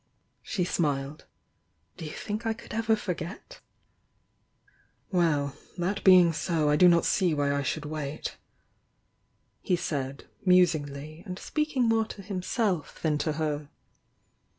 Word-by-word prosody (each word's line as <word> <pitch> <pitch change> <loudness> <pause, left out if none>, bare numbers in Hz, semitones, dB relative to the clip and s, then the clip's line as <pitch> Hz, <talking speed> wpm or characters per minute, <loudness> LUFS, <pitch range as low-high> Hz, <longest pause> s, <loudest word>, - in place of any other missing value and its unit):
She 185 - -2
smiled. 145 -4 -1 0.7
"Do 165 - -7
you 150 - -6
think 210 +2 -4
I 225 -1 0
could 225 - -11
ever 225 0 +2
forget?" 180 -3 -6 1.5
"Well! 150 -6 +1
— - - -27
that 185 +4 -1
being 180 -3 +7
so 155 -2 +1
I - - +4
do 180 +4 +7
not 170 -1 +5
see 180 -5 +2
why 145 -1 +1
I 140 - 0
should 140 - -2
wait," 150 -1 -4 1.3
he 185 - +1
said, 140 -5 -4 0.2
musingly, 155 -4 +2
and 180 0 -5
speaking 300 +1 -1
more 225 -1 +3
to 200 -2 -9
him 190 -1 -4
self 185 - -1
than 150 -2 +1
to 155 - 0
her. 150 -1 -2
170 Hz, 140 wpm, -28 LUFS, 150-195 Hz, 1.5 s, being